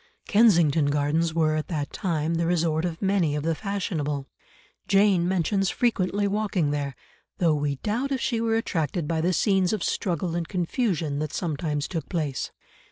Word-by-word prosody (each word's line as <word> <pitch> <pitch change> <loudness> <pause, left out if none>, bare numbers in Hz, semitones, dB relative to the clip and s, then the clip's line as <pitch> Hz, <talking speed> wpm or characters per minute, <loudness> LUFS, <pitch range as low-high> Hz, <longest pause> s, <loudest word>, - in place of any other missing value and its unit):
Kensington 170 -9 +4
Gardens 150 +3 +1
were 155 -2 +2
at 155 - -2
that 150 -4 -3
time 165 -3 -1
the 165 0 0
resort 165 -1 +1
of 170 +1 -4
many 190 -6 +2
of 150 - -2
the 165 +1 +1
fashionable; 155 -7 -3 0.6
Jane 195 -3 +4
mentions 190 +1 +1
frequently 205 -4 +1
walking 200 -7 0
there, 140 -2 -2 0.4
though 170 -3 +3
we 145 -1 0
doubt 230 - -2
if 270 - 0
she 235 -2 -1
were 225 -1 +1
attracted 165 -7 -1
by 160 0 0
the 175 +3 +2
scenes 190 0 +2
of 210 - -1
struggle 175 -2 -1
and 170 -1 -2
confusion 175 - -1
that 155 0 -3
sometimes 150 -3 -2
took 165 -3 -5
place. 150 -7 -2
170 Hz, 165 wpm, -25 LUFS, 150-195 Hz, 0.6 s, Kensington